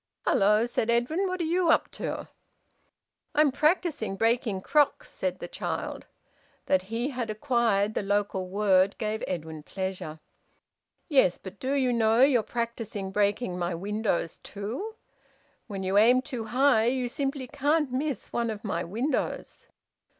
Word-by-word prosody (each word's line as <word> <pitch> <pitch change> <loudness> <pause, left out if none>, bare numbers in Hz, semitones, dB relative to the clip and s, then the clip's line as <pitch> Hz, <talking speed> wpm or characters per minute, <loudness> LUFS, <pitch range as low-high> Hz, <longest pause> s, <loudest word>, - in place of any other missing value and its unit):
"Hello!" 210 +3 +4
said 240 -1 -1
Edwin. 255 +12 +1
"What 370 0 -3
are - - +1
you 340 +1 +1
up - - +3
to?" - - -4 1.1
"I'm 300 -1 +5
practising 300 - +1
breaking 225 -2 +1
crocks," 290 +6 +2
said 185 -1 -2
the 175 - -7
child. - - -4 0.6
That 185 - +3
he 230 +7 -3
had 245 -3 -3
acquired 215 -3 +1
the - - -1
local 200 -2 -1
word 195 -1 +3
gave 215 0 -2
Edwin 160 -3 -4
pleasure. 185 -2 -5 0.9
"Yes, 260 - +4
but 190 +1 -11
do 270 +2 0
you 255 -2 +2
know 225 +1 +4
you're 265 -4 +5
practising 230 -4 -4
breaking 205 -1 0
my 175 0 -1
windows 200 -2 -2
too? 240 - -6 0.7
When 195 -3 -5
you 190 +2 +3
aim 250 +4 +5
too 250 -6 -5
high 245 0 +3
you 250 +1 +1
simply 270 +1 -3
can't 290 +2 +1
miss 275 +1 -3
one 235 -1 0
of 215 -2 -5
my 175 -5 -2
windows." 235 - -3
225 Hz, 145 wpm, -27 LUFS, 195-265 Hz, 1.1 s, I'm